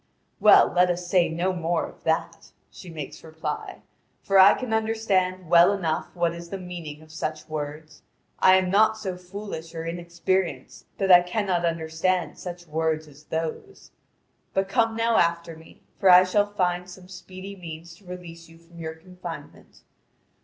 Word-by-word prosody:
"Well, - - +7
let 180 0 +4
us 175 0 -2
say 180 -1 +3
no 175 +3 -1
more 170 -1 -1
of - - -14
that," - - -2 0.2
she 185 - -12
makes 155 -3 -8
reply, 380 - -6 0.4
"for 195 -1 +4
I 190 +2 +8
can 250 -3 -4
understand 200 -5 0
well 170 +3 +6
enough 170 -6 -1
what 170 -1 +1
is 170 0 -9
the 195 - -4
meaning 170 -5 -8
of 155 - -17
such 155 -1 -5
words. 155 0 -6 0.4
I 185 - +7
am 185 -1 +1
not 220 +2 +4
so 195 -4 -4
foolish 180 -3 -8
or 165 0 -5
inexperienced 170 -3 -3
that 195 -1 +2
I 175 0 +9
cannot 180 -1 -1
understand 165 +2 -1
such 175 -1 -7
words 160 0 -1
as 150 +1 -17
those; 165 - -5 0.6
but 195 0 +1
come 225 +2 +1
now 230 0 +2
after 170 -1 +1
me, 160 0 -17 0.2
for 195 - +4
I 180 0 +9
shall 205 +3 +2
find 180 -2 -1
some 180 0 -12
speedy 185 +1 -10
means 165 -2 -9
to 195 - -22
release 170 -2 -10
you 165 - -16
from 170 +1 -17
your 160 -1 -5
confinement. 175 -3 -11
175 Hz, 165 wpm, -25 LUFS, 165-190 Hz, 0.6 s, I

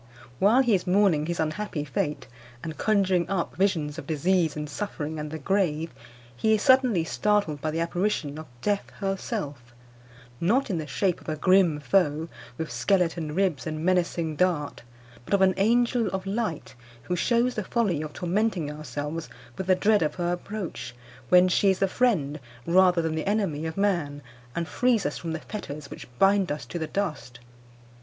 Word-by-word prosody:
While 225 +7 +5
he 240 -4 +2
is 185 -2 +1
mourning 180 -5 +3
his 170 0 -3
unhappy 155 0 -2
fate, 150 0 -2 0.4
and 160 -1 -5
conjuring 190 -5 +1
up 190 -3 -2
visions 165 -5 0
of - - -9
disease 165 +1 +1
and 150 0 -4
suffering 155 -1 -4
and 150 0 -4
the 160 - -5
grave, 165 -1 0 0.4
he 220 - +3
is 215 - -2
suddenly 255 - +4
startled 200 -4 0
by 155 - -1
the 160 +2 -1
apparition 170 -4 -1
of 155 - -9 0.2
Death 205 -1 0
herself, 145 - -4 0.6
not 225 +9 +2
in 175 - -1
the 155 - -5
shape 180 +5 0
of - - -8
a 155 - -1
grim 180 -1 +3
foe, 160 -1 +1 0.3
with 160 -1 -4
skeleton 170 -5 0
ribs 185 -8 0
and 155 +1 -3
menacing 170 -3 +1
dart, 170 -5 0 0.4
but 200 - +1
of 195 - +1
an 190 0 +5
angel 235 +2 +2
of 190 0 -3
light, 200 -5 -3 0.3
who 180 - -2
shews 240 +6 +2
the 215 - -3
folly 190 -7 0
of 155 -1 -5
tormenting 180 -2 -1
ourselves 150 +2 -5 0.3
with 190 -1 -5
the 185 - +5
dread 210 +3 +3
of 155 - 0
her 175 -1 -1
approach, 175 - -5 0.3
when 180 0 +7
she 195 +2 +3
is 190 - +2
the 195 - +2
friend, 185 - +1 0.3
rather 180 -1 +4
than 160 -1 -1
the 160 +4 -3
enemy, 175 -8 0
of 160 - -6
man, 170 -8 0 0.3
and 170 -1 -2
frees 245 -5 +1
us 145 - -2
from 165 -2 -4
the 160 - -3
fetters 150 -9 -7
which - - -9
bind 195 +2 +4
us 150 - -4
to 175 - -5
the 160 - -3
dust. 155 -12 -3
175 Hz, 180 wpm, -26 LUFS, 155-200 Hz, 0.6 s, when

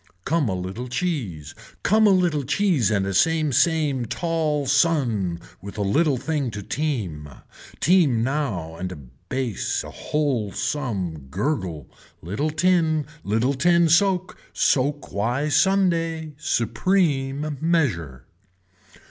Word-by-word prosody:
Come 155 -5 +1
a 95 - -1
little 95 +7 -5
cheese. 120 - -3 0.3
Come 215 +2 +4
a - - +6
little 175 -6 +2
cheese 160 - +2
and 100 -2 0
same 155 - +3
same 145 -5 +2
tall 150 +2 -1
sun 125 - +1 0.2
with 100 +3 -9
a 105 - 0
little 140 +8 +2
thing 145 0 -2
to 105 - -5
team, 100 - -3 0.5
team 150 -9 +3
now 115 - -2
and 90 +1 -4
a - - -6
bass 95 - -4
a - - -9
whole 135 -9 -1
some 95 - -3
gurgle, 90 - -2 0.3
little 105 - -2
tin, 160 -2 +2 0.2
little 115 +6 +1
tin 170 +4 +3
soak, 185 +2 +2
soak 145 +2 +1
why 120 +9 0
Sunday, 165 -4 +1
supreme 145 - 0
measure. 105 - 0
140 Hz, 120 wpm, -23 LUFS, 100-160 Hz, 0.5 s, a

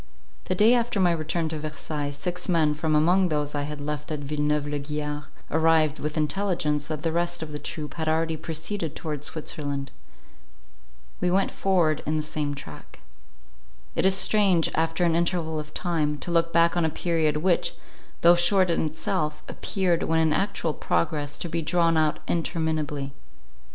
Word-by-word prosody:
The 185 - -1
day 215 +6 +6
after 235 -4 +1
my 180 -2 +4
return 160 0 -1
to 155 -1 -4
Versailles, 150 -1 -4
six 180 +6 -4
men, 160 -4 +3
from 155 +1 0
among 180 +4 +4
those 150 -1 -1
I 145 - -1
had 150 -1 -6
left 150 +1 -4
at 150 -1 -3
Villeneuve 150 +1 0
la 145 0 -2
Guiard, 150 0 -4 0.3
arrived, 160 -1 +3
with 150 +1 -3
intelligence, 155 -2 0
that 155 -2 -4
the 165 - +1
rest 175 0 -1
of 155 - -7
the 150 - -4
troop 150 +1 -5
had 160 -1 -2
already 160 0 +1
proceeded 160 +1 -4
towards 150 -3 -4
Switzerland. 145 -3 -4 1.3
We 180 - +1
went 190 +2 +2
forward 175 -6 +1
in 155 +1 +1
the 155 - -1
same 150 -1 -3
track. 80 - -11 0.9
It - - 0
is 190 - +4
strange, 195 -4 +4
after 165 +2 0
an 170 -2 +3
interval 170 -2 0
of 150 0 -7
time, 155 -4 -1
to 175 - -3
look 165 0 +2
back 170 0 +4
on 175 - +2
a 160 - +2
period, 160 -2 0
which, 175 +2 +1 0.5
though 170 +1 +8
short 180 +1 +4
in 165 - +1
itself, 150 -1 -2
appeared, 185 -4 0
when 165 - +1
in 160 -1 +3
actual 195 -4 0
progress, 145 - -1
to - - -4
be 165 0 -2
drawn 165 +1 +2
out 155 -1 +1
interminably. 155 -4 -1
160 Hz, 175 wpm, -26 LUFS, 150-170 Hz, 1.3 s, though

